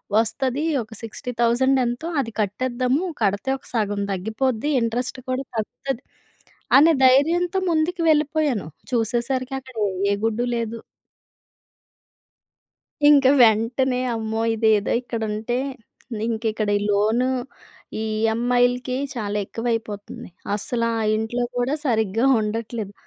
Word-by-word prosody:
వస్తది 260 +5 +1 0.2
ఒక 215 - -20
60000 240 +3 +1
ఎంతో.అది 265 0 -2
కట్టేద్దాము 255 - 0 0.2
కడితే 200 +5 0
ఒక - - -24
సగం 205 -3 0
తగ్గిపోద్ది. 220 +7 -1
ఇంట్రెస్ట్ 240 +2 -2
కూడా 255 +1 -1
తగ్గుతది, 255 +4 -4 0.7
అనే 320 +3 +6
ధైర్యంతో 335 +8 +3
ముందుకు 335 +3 0
వెళ్ళిపోయాను. 300 - +1 0.3
చూసేసరికి 245 +3 0
అక్కడ 260 -1 -15 0.4
ఏ - - +2
గుడ్డు 225 +2 0
లేదు. 230 0 -3 2.3
ఇంక 280 -2 +6 0.2
వెంటనే 240 +3 +3 0.2
అమ్మో! 220 0 -2
ఇదేదో 215 -2 +2
ఇక్కడ 235 -2 -5
ఉంటే, 225 +4 -2 0.7
ఇంక 225 0 -2
ఇక్కడ 215 -1 -2
ఈ - - -2
లోన్, 215 +5 +2 0.8
ఈ - - -2 0.2
ఈఎంఐలకి 245 +2 +1 0.2
చాలా 210 -2 -2
ఎక్కువ 230 +4 -7
అయిపోతుంది. 210 -4 -6 0.3
అస్సలు 230 +2 -2
ఆ 230 - -1 0.2
ఇంట్లో 220 +3 -1
కూడా 245 +4 0
సరిగ్గా 220 -1 +1 0.2
ఉండట్లేదు. 215 -1 -4
235 Hz, 110 wpm, -23 LUFS, 220-260 Hz, 2.3 s, అనే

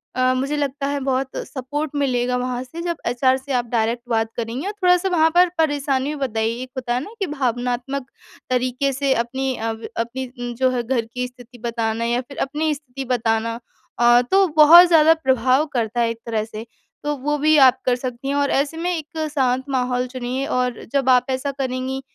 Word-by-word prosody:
अ, 255 0 +2
मुझे 275 +3 -1
लगता 280 -1 -2
है 285 0 -1
बहुत 265 0 -1
सपोर्ट 290 +3 -4
मिलेगा 250 -3 0
वहाँ 250 0 -2
से 290 +7 -8
जब 340 -1 -2
एचआर 260 +2 +2
से 265 +1 -6
आप 245 -1 +1
डायरेक्ट 230 0 0
बात 225 -1 +1
करेंगी 235 +6 -4
और - - -1
थोड़ा-सा 360 +1 +4
वहाँ 325 -3 +4
पर 360 0 +6
परेशानी 290 -3 0
बताइए 230 -4 -2
एक 255 - -10
होता 245 -2 -2
है 245 - +1
ना, 410 - -10
कि 395 - 0
भावनात्मक 255 0 -2 0.4
तरीके 255 +2 0
से 275 0 +1
अपनी 260 +2 -2
अ, 225 +1 -2 0.3
अपनी 245 +1 -4
जो 260 -1 +4
है 245 -1 -1
घर 235 -1 -1
की 250 +2 -4
स्थिति 245 -1 -16
बताना 230 -1 -2
या 240 +1 0
फिर 275 +2 -13
अपनी 305 +3 -1
स्थिति 270 -2 -8
बताना 230 -2 0 0.4
अ, 240 0 +6
तो 390 0 +5
बहुत 335 +4 +9
ज़्यादा 320 -2 +6
प्रभाव 260 -2 +2
करता 235 -1 -1
है 230 - +2
एक 230 0 -5
तरह 225 -2 -1
से। 220 0 -8 0.4
तो 295 0 -1
वो 295 +3 -1
भी 305 +1 +4
आप 255 - +2
कर 250 - +3
सकती 250 +1 -6
हैं 280 - 0
और 285 0 +1
ऐसे 285 +4 0
में 350 +2 -1
एक 315 0 -4
शांत 260 -2 +1
माहौल 250 -1 0
चुनिए 255 +1 -3
और 250 -3 -1
जब 270 -2 +2
आप 250 -1 +5
ऐसा 260 +2 -1
करेंगी 265 0 -3
260 Hz, 200 wpm, -21 LUFS, 245-285 Hz, 0.4 s, बहुत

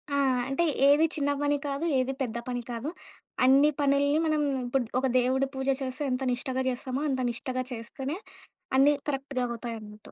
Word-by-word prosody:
ఆ! - - +2 0.3
అంటే, 305 +5 +1 0.2
ఏది 295 +3 +6
చిన్న 285 -2 +1
పని 290 0 +2
కాదు, 280 +4 -2
ఏది 260 +1 0
పెద్ద 235 -2 -2
పని 245 -1 -2
కాదు. 235 +6 -3 0.6
అన్ని 275 +3 +6
పనిల్ని 285 +2 +3
మనం 310 -1 +2 0.2
ఇప్పుడు 245 0 0
ఒక 265 - +1
దేవుడి 260 +2 +1
పూజ 265 0 -3
చేస్తే, 260 +2 -3
ఎంత 255 +1 -1
నిష్టగా 260 +1 -2
చేస్తామో, 255 +2 -3
అంత 260 -1 0
నిష్టగా 255 +2 -3
చేస్తేనే, 265 +7 -5 0.6
అన్నీ 285 +2 +6 0.2
కరెక్ట్‌గా 270 -2 -2
అవుతాయన్నట్టు. 225 -3 -7
265 Hz, 160 wpm, -28 LUFS, 250-285 Hz, 0.6 s, ఏది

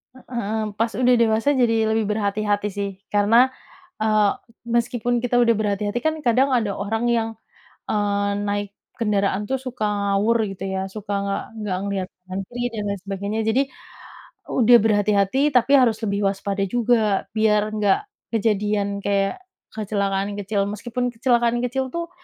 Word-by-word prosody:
Hmm. 220 -4 -4
Pas 225 +2 0
udah 250 +1 +3
dewasa 230 +4 +2
jadi 225 -3 +2
lebih 220 0 +1
berhati-hati 210 0 0
sih. 200 0 -3 0.2
Karena, 215 +5 +4 0.5
eee, 215 -1 +3 0.4
meskipun 240 0 0
kita 245 +1 -2
udah 230 -1 +4
berhati-hati 205 +1 -1
kan 315 +6 0
kadang 255 +2 +3
ada 225 -4 +1
orang 220 +3 -2
yang, 230 -1 +1 0.6
eee, 205 -1 0
naik 205 0 -2 0.3
kendaraan 205 -3 0
tuh 265 - +1
suka 250 -4 -4
ngawur 205 +2 +1
gitu 195 0 -6
ya, 190 0 -2
suka 205 +1 -6
nggak 200 0 -2 0.2
nggak 195 -3 -2
ngelihat 195 -2 -2 0.2
kanan 185 +1 -5
kiri 245 0 -4
dan 210 -2 -3
lain 200 -1 -3
sebagainya, 200 +2 -3
jadi 220 +4 +2 0.9
udah 240 -1 +6
berhati-hati 205 +1 +2
tapi 250 +2 +3
harus 240 -5 +3
lebih 200 -2 -1
waspada 195 0 -1
juga 220 -2 +1
biar 210 -1 +3
nggak 205 -2 +3 0.3
kejadian 205 -2 0
kayak 200 - +1 0.3
kecelakaan 200 -2 -2
kecil, 200 0 -1
meskipun 240 +4 -3
kecelakaan 240 -1 +2
kecil 260 +1 -2
tuh, 340 0 -3
215 Hz, 145 wpm, -22 LUFS, 200-235 Hz, 0.9 s, udah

